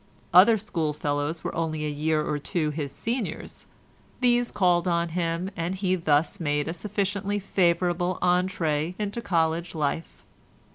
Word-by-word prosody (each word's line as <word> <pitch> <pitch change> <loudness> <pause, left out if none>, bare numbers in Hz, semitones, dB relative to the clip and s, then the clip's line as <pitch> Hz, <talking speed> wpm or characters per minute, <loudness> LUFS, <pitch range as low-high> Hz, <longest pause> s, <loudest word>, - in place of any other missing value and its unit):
Other 205 +6 +8
schoolfellows 155 -5 -2
were - - -3
only 155 -2 -2
a - - -1
year 155 +1 0
or 150 -1 -1
two 155 +1 -1
his 145 -2 -4
seniors; 225 - -4 0.5
these 245 -1 +3
called 180 -3 +2
on 170 -1 +1
him, 170 +2 -2
and 170 +3 -2
he 185 -1 0
thus 160 +1 +1
made 145 -2 0
a 165 - -2
sufficiently 200 +1 -2
favourable 180 -2 +1
entrée 180 -3 +1
into 210 +2 -3
college 165 -3 0
life. 155 +1 -3
170 Hz, 140 wpm, -26 LUFS, 155-190 Hz, 0.5 s, Other